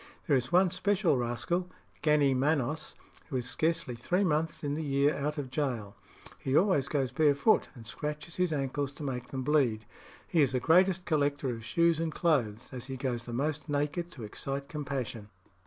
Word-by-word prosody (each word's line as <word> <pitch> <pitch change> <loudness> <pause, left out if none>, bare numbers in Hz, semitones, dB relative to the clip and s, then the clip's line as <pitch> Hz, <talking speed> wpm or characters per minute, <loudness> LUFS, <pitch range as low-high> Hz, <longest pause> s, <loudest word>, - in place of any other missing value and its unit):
There 150 - +3
is 130 +2 0
one 180 0 +5
special 190 -3 +2
rascal, 125 +9 -1 0.3
Gannee 150 -3 +4
Manos, 145 +2 0 0.3
who 140 - -4
is 125 -1 -1
scarcely 165 -5 0
three 175 +12 0
months 160 -3 0
in 145 -1 -1
the 155 - -2
year 140 +1 +2
out 150 +2 -2
of 135 -3 -4
gaol. 125 -8 -2 0.4
He 135 +2 +1
always 180 -8 +3
goes 135 -5 0
barefoot, 145 +7 +3
and 115 -3 -11
scratches 150 +6 -5
his 180 -2 +1
ankles 140 -1 -1
to 150 - -9
make 125 -3 -3
them 130 -1 -4
bleed. 125 -7 +2 0.4
He 165 - +3
is 135 -2 +3
the 130 - +2
greatest 180 +5 +4
collector 145 -4 +1
of 115 -2 -6
shoes 170 +7 +2
and 165 -1 -1
clothes, 130 - 0
as 125 -2 -6
he 135 0 -5
goes 125 -2 -3
the - - -5
most 150 +4 -2
naked 150 +4 -1
to 125 - -9
excite 135 +6 -4
compassion." 130 -8 -4
145 Hz, 185 wpm, -30 LUFS, 130-160 Hz, 0.4 s, one